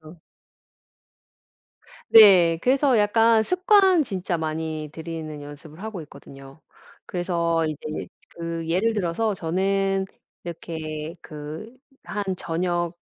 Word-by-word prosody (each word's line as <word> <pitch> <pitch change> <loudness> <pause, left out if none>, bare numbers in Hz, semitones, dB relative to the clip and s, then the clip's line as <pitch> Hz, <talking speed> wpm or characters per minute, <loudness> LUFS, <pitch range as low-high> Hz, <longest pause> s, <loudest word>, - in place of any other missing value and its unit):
그래서 160 +1 -14 1.9
네. 180 -7 +8
그래서 265 -1 +3
약간 225 +2 +4
습관 370 - +4
진짜 185 -6 -3
많이 155 -1 -4
들이는 160 -2 -7
연습을 145 +4 -11
하고 220 -5 -6
있거든요. 140 -1 -14 0.5
그래서 170 -2 0
이제 155 0 -5 0.2
그 165 -1 -5
예를 195 +7 +1
들어서 205 +2 -1
저는 195 +3 0 0.4
이렇게 160 -2 -6
그 155 +10 -9 0.3
한 205 -1 -3
저녁 175 0 -2
170 Hz, 215 characters per minute, -24 LUFS, 160-205 Hz, 1.9 s, 네